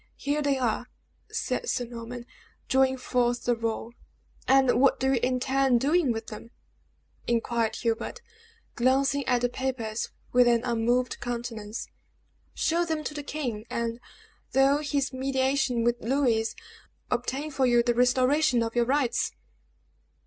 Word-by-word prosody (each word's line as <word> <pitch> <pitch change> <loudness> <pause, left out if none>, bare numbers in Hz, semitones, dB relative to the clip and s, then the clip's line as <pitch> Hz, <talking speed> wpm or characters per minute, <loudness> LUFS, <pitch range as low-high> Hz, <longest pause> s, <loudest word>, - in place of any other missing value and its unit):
Here 290 +2 -1
they 285 -2 +1
are," 245 -1 -1 0.4
said 475 - -2
Sir 245 - 0
Norman, 235 +1 -8 0.4
drawing 265 0 +3
forth 245 -1 0
the 245 - +2
roll. 230 0 -3 0.5
"And 265 -2 +4
what 275 - +4
do 265 +1 +2
you 250 - +2
intend 255 0 +2
doing 295 +1 +2
with 225 -1 -4
them?" 220 +1 -9 0.8
inquired 235 -1 0
Hubert, 230 - -2 0.5
glancing 270 +3 +2
at 245 -1 +2
the 245 - +3
papers 240 -4 -3 0.2
with 245 0 +6
an 235 -1 +3
unmoved 240 +1 0
countenance. 235 -3 -5 0.7
"Show 335 +2 +1
them 320 -2 -2
to - - -4
the 295 - -5
king, 250 -7 -4
and, 235 0 -2 0.5
though 270 +2 +4
his 280 -2 -1
mediation 265 -2 0
with 240 0 +1
Louis, 230 -3 +1 0.6
obtain 260 +5 -2
for 265 -2 +1
you 240 -1 +4
the 240 0 +2
restoration 255 +2 +3
of 225 +1 -4
your 240 -1 +3
rights." 255 - +1
250 Hz, 140 wpm, -27 LUFS, 235-270 Hz, 0.8 s, with